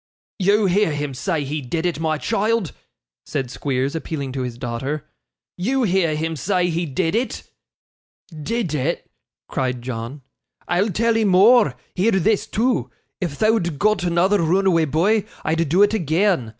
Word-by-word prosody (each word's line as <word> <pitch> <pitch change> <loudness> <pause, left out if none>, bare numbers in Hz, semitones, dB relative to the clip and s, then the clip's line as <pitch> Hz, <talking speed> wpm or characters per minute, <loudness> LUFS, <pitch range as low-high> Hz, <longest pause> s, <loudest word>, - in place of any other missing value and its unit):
'You 200 +2 +3
hear 195 -2 +2
him 145 -1 -3
say 155 +4 -1
he 145 +2 -3
did 160 +6 -3
it, 170 -4 -1
my 160 -1 0
child!' 215 +1 0 0.5
said 130 -3 -3
Squeers, 135 0 -1
appealing 155 -4 -4
to 130 0 -3
his 125 -2 -4
daughter. 130 +5 -4 0.5
'You 255 +9 0
hear 180 -6 +2
him 160 +1 -2
say 180 +4 0
he 170 +1 -1
did 165 +4 -1
it!' 240 +4 -1 0.9
'Did 170 +3 -3
it!' 150 +3 -2 0.4
cried 125 -2 -2
John. 125 +3 -6 0.4
'I'll 180 +5 +1
tell 230 +4 +1
'ee 225 - +2
more; 200 - +5 0.2
hear 205 +5 +2
this, 195 +3 +2
too. 220 - 0 0.3
If 175 -5 -2
thou'd 215 -8 +1
got 215 +1 +2
another 180 +4 +2
roonaway 170 -1 +2
boy, 200 +8 +2 0.2
I'd 165 -1 0
do 185 +6 +5
it 205 - +3
agean. 170 - +1
170 Hz, 155 wpm, -21 LUFS, 145-205 Hz, 0.9 s, more